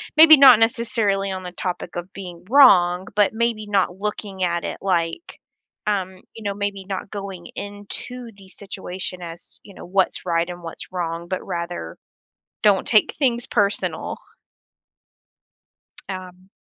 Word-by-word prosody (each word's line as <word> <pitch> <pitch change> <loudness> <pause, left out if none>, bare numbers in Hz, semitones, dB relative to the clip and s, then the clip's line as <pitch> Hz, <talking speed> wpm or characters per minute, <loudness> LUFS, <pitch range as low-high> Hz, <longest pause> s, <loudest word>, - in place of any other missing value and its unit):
maybe 315 0 +10
not 265 -5 +9
necessarily 225 -4 +1
on 190 -1 -4
the 180 - -6
topic 180 0 -5
of 175 +2 -6
being 180 -3 -9
wrong, 185 -9 +6
but 205 0 +3
maybe 225 -1 -1
not 190 -3 +1
looking 205 -2 -4
at 170 -1 0
it - - -4
like, 180 - -2 0.5
um, 190 -3 -2
you 225 - -10
know, 200 -1 -1
maybe 200 -1 -4
not 195 0 -4
going 195 -4 -7
into 205 +4 -7
the 195 -1 -15
situation 185 -2 -7
as, 170 0 -9
you 200 - -13
know, - - -11
what's 190 +1 0
right 170 0 0
and 175 -1 -8
what's 165 - -7
wrong, 170 -1 -3
but 185 +1 -4
rather, 170 - -5 0.7
don't 205 -2 +4
take 215 -2 +4
things 245 -4 +1
personal. 205 -2 -1 1.9
Um 185 -1 -8
195 Hz, 145 wpm, -22 LUFS, 180-210 Hz, 1.9 s, maybe